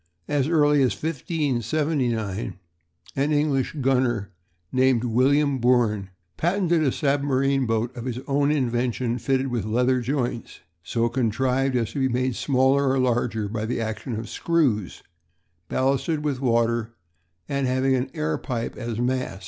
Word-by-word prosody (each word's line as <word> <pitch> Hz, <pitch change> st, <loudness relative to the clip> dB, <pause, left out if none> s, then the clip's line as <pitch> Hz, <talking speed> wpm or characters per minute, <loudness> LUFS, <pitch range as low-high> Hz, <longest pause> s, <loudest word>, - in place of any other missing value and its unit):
As 145 Hz, -2 st, +1 dB
early 150 Hz, -3 st, +4 dB
as 130 Hz, -, +2 dB
1579 135 Hz, -, -1 dB, 0.6 s
an 140 Hz, +3 st, +1 dB
English 145 Hz, -2 st, +1 dB
gunner 125 Hz, -6 st, +1 dB, 0.4 s
named 130 Hz, -2 st, +3 dB
William 135 Hz, +4 st, +2 dB
Bourne 115 Hz, -5 st, +2 dB, 0.3 s
patented 175 Hz, -1 st, +1 dB
a 140 Hz, -4 st, +2 dB
submarine 140 Hz, -2 st, +1 dB
boat 115 Hz, +2 st, -1 dB
of 120 Hz, -, -6 dB
his 125 Hz, -2 st, -3 dB
own 140 Hz, 0 st, +2 dB
invention 125 Hz, -3 st, 0 dB
fitted 135 Hz, +2 st, 0 dB
with 120 Hz, -4 st, -2 dB
leather 125 Hz, +4 st, +1 dB
joints, 120 Hz, -2 st, -3 dB, 0.2 s
so 115 Hz, +6 st, 0 dB
contrived 130 Hz, +2 st, 0 dB
as 115 Hz, -3 st, 0 dB
to 145 Hz, -, -4 dB
be 130 Hz, -1 st, +2 dB
made 125 Hz, 0 st, 0 dB
smaller 135 Hz, +1 st, +2 dB
or 135 Hz, -, +2 dB
larger 120 Hz, -4 st, 0 dB
by 110 Hz, +1 st, -3 dB
the 120 Hz, -, -2 dB
action 115 Hz, +2 st, -4 dB
of 110 Hz, +1 st, -5 dB
screws, 120 Hz, -, 0 dB, 0.7 s
ballasted 140 Hz, +4 st, 0 dB
with 140 Hz, -4 st, -1 dB
water, 115 Hz, -2 st, +1 dB, 0.5 s
and 140 Hz, -1 st, -1 dB
having 130 Hz, +1 st, +1 dB
an 130 Hz, +1 st, 0 dB
air 80 Hz, 0 st, -1 dB
pipe 115 Hz, -2 st, -4 dB
as 115 Hz, -3 st, -4 dB
mast. 125 Hz, -4 st, -1 dB
130 Hz, 140 wpm, -24 LUFS, 115-140 Hz, 0.7 s, early